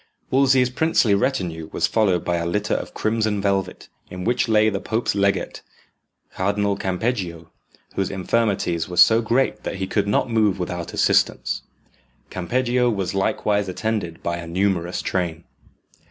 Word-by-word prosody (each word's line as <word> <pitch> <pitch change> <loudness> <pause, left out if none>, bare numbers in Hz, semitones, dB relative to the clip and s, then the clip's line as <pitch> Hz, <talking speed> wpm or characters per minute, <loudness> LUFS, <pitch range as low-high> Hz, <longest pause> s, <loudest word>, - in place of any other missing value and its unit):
Wolsey's 130 -1 +4
princely 130 -7 +2
retinue 90 - -1
was - - +1
followed 100 -6 +1
by 85 0 0
a 85 - -2
litter 105 +4 -1
of - - -4
crimson 110 -1 0
velvet, 95 -2 -1 0.2
in 90 0 -6
which 120 +4 +1
lay 110 0 +4
the 100 -3 0
pope's 110 +4 -1
legate, 100 0 0 0.7
Cardinal 100 +1 0
Campeggio, 95 -4 -3 0.4
whose 95 - -1
infirmities 95 -4 0
were 90 - -6
so 115 +1 +7
great 120 +4 0
that - - -4
he 95 0 -3
could 100 +1 -1
not 105 - +1
move 110 -4 +2
without 90 -2 -4
assistance. - - +1 0.7
Campeggio 125 +6 0
was 100 -4 -2
likewise 100 0 0
attended 95 -4 -3
by 85 0 -1
a 85 -1 -7
numerous 90 0 -1
train. 85 -3 -2
100 Hz, 145 wpm, -22 LUFS, 90-110 Hz, 0.7 s, so